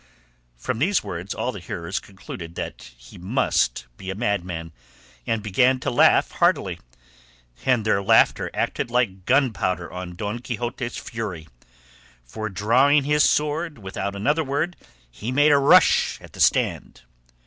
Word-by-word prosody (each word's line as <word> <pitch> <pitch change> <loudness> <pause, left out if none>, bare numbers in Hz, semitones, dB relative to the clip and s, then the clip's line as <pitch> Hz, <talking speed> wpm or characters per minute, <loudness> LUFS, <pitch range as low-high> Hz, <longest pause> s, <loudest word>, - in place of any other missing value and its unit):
From - - -3
these 185 +9 +2
words 90 +3 -5
all 125 - -2
the 100 - -8
hearers 85 +1 -4
concluded 85 -3 -10
that - - -6
he - - -15
must 110 +10 0
be 95 - -8
a 95 - -3
madman, 90 -7 -2 0.6
and 115 -2 -1
began 125 +5 +3
to - - -1
laugh - - +4
heartily, - - +1 0.9
and 125 -4 +2
their 100 -2 +2
laughter 115 +3 +3
acted - - -2
like 105 -7 -1
gunpowder 110 -10 +1
on 90 -1 -7
Don 105 +5 -4
Quixote's 120 +1 -4
fury, 95 -9 -6 0.8
for 110 - -6
drawing 125 +9 +3
his 150 +1 +3
sword 150 +1 0
without 100 -1 -5
another 145 +11 +1
word 150 +5 -2 0.4
he 110 - -5
made 145 +3 +4
a 145 - +5
rush 140 - +4
at - - -15
the - - -12
stand. - - +1
110 Hz, 145 wpm, -23 LUFS, 95-130 Hz, 0.9 s, a